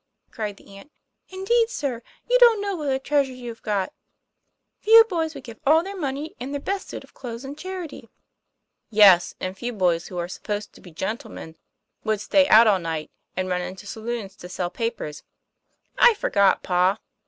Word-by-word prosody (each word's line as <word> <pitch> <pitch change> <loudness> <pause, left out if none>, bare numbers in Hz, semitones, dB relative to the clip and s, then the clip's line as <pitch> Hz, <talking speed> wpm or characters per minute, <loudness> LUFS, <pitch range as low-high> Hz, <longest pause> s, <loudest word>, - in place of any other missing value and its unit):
cried 210 -3 -5
the 195 - -16
aunt. 200 +10 -14 0.4
"Indeed, 450 +5 +1
sir, 275 - -3 0.3
you - - +4
don't 470 -3 +7
know 400 -1 -2
what 300 -4 -3
a 265 - +1
treasure 275 -1 0
you've 240 -2 -8
got. 200 -3 -2 0.9
Few 450 +1 +8
boys 330 -7 -3
would 275 - -9
give 230 0 -11
all 315 +3 +4
their 395 +2 -7
money 295 -2 -4
and 255 +3 -5
their - - -2
best 390 +6 -4
suit - - -7
of - - -20
clothes 240 0 -8
in 275 +2 -7
charity." 365 -2 -7 0.4
' - - -55 0.2
Yes, 200 -5 +6
and 185 +1 -4
few 240 +4 -5
boys 175 -5 +1
who 180 - -8
are 175 0 -2
supposed 205 +3 -5
to - - -17
be 180 - -13
gen 190 +7 -3
tlemen 160 - -10 0.5
would 215 -2 0
stay 280 +7 +3
out 225 +2 +8
all 205 -4 +4
night, 160 -3 -4 0.3
and 185 0 -1
run 180 -1 -1
into 185 +2 -7
saloona 220 0 -5
to 180 - -10
sell 180 -1 -3
papers." 190 -8 -4 0.4
" - - -52 0.3
I 485 -2 +7
forgot, 200 - +2
pa. 180 +2 +2
235 Hz, 195 wpm, -24 LUFS, 190-310 Hz, 0.9 s, Few